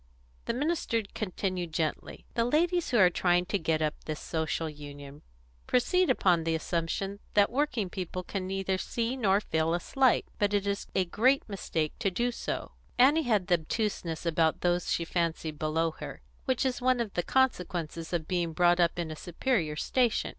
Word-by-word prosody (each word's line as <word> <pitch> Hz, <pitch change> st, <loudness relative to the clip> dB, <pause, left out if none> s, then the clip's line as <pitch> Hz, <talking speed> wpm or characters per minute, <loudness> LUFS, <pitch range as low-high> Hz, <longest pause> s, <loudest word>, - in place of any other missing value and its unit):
The -, -, -1 dB
minister 290 Hz, -5 st, 0 dB
continued 185 Hz, -4 st, -3 dB
gently: 155 Hz, -1 st, -3 dB
"The 230 Hz, -, +2 dB
ladies 335 Hz, +7 st, +1 dB
who 245 Hz, -, +2 dB
are 185 Hz, -4 st, +6 dB
trying 175 Hz, 0 st, +2 dB
to 200 Hz, +2 st, -1 dB
get 160 Hz, -1 st, 0 dB
up 155 Hz, 0 st, +1 dB
this 155 Hz, -1 st, -4 dB
Social 160 Hz, 0 st, -2 dB
Union 145 Hz, -1 st, -10 dB, 0.5 s
proceed 360 Hz, +8 st, +2 dB
upon 180 Hz, -9 st, +3 dB
the 165 Hz, 0 st, 0 dB
assumption 170 Hz, +5 st, -2 dB, 0.2 s
that 205 Hz, 0 st, +5 dB
working 250 Hz, -6 st, 0 dB
people 185 Hz, 0 st, -5 dB
can 185 Hz, 0 st, -4 dB
neither 190 Hz, 0 st, -1 dB
see 235 Hz, +5 st, -2 dB
nor 200 Hz, -6 st, +3 dB
feel 160 Hz, -4 st, 0 dB
a -, -, -1 dB
slight; 260 Hz, +6 st, +2 dB
but 205 Hz, 0 st, +2 dB
it 200 Hz, 0 st, +1 dB
is 200 Hz, 0 st, -2 dB
a 190 Hz, -, +3 dB
great 255 Hz, +10 st, +2 dB
mistake 165 Hz, -6 st, -2 dB
to 215 Hz, -4 st, +1 dB
do 240 Hz, +7 st, 0 dB
so." -, -, -4 dB, 0.3 s
Annie 280 Hz, +6 st, +6 dB
had 205 Hz, -5 st, +3 dB
the 175 Hz, -2 st, +3 dB
obtuseness 170 Hz, -2 st, -3 dB
about 160 Hz, -1 st, +2 dB
those 175 Hz, -1 st, +1 dB
she 170 Hz, -, 0 dB
fancied 165 Hz, -3 st, -2 dB
below 160 Hz, +1 st, +1 dB
her -, -, -8 dB, 0.2 s
which 260 Hz, -1 st, +1 dB
is 255 Hz, -1 st, -1 dB
one 255 Hz, 0 st, +3 dB
of 225 Hz, -4 st, -2 dB
the 175 Hz, -, +1 dB
consequences 175 Hz, -9 st, 0 dB
of 165 Hz, -3 st, -2 dB
being 175 Hz, -2 st, -1 dB
brought 175 Hz, +1 st, +4 dB
up 170 Hz, 0 st, +2 dB
in 170 Hz, -2 st, -3 dB
a -, -, -5 dB
superior 175 Hz, -, -1 dB
station. 240 Hz, +8 st, +1 dB
185 Hz, 180 wpm, -29 LUFS, 165-230 Hz, 0.5 s, are